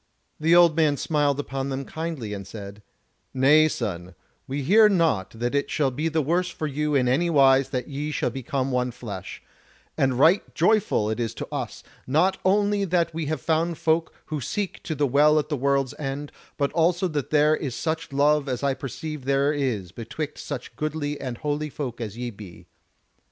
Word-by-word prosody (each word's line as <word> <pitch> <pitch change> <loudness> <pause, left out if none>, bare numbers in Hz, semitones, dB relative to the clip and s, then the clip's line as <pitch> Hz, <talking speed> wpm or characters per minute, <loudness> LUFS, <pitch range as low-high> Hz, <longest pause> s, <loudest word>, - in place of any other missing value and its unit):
The 165 +2 +4
old 170 -3 +6
man 155 -3 +3
smiled 145 -2 +1
upon 135 -1 -3
them 135 0 -3
kindly, 160 -10 -5
and 100 -2 -7
said: 100 0 -9 0.5
"Nay, 150 +4 +6
son, 90 - -4 0.3
we 140 +1 -3
hear 210 +8 +6
not 165 - +1
that 120 +4 -3
it 140 0 0
shall 140 -3 +1
be 155 +6 -1
the 160 -1 0
worse 175 +5 +1
for 160 - -5
you 150 0 -1
in 130 -2 +3
any 155 +8 +2
wise 135 -3 +5
that 125 -3 -3
ye 145 +1 -4
shall 150 - -1
become 135 0 -2
one 125 0 0
flesh; 105 -7 -8 0.5
and 130 -2 +1
right 165 +9 +3
joyful 195 - +2
it 110 - -3
is 115 -1 -2
to - - -5
us, - - -5 0.2
not 175 +8 +2
only 205 +1 +2
that 170 -3 +1
we 160 -2 -3
have 155 -3 -2
found 165 +2 0
folk 160 +1 +1
who 155 -2 -4
seek 200 +9 -3
to 155 - -4
the 145 0 +1
Well 145 +3 +4
at 150 -1 0
the 150 - 0
World's 135 -1 +1
End, 145 0 -4 0.3
but 140 -1 0
also 175 +3 +2
that 145 -4 -3
there 150 0 +4
is 135 -6 -4
such 160 -2 -3
love 145 +1 +2
as 125 +1 -3
I 140 -1 +2
perceive 140 +2 -6
there 140 +2 +2
is 120 - -2
betwixt 145 +8 -6
such 125 -1 -6
goodly 150 +1 -3
and 125 -2 -4
holy 150 +1 -2
folk 130 -5 -5
as 110 -1 -5
ye 120 0 -4
be. 100 -5 -12
145 Hz, 195 wpm, -25 LUFS, 130-160 Hz, 0.5 s, old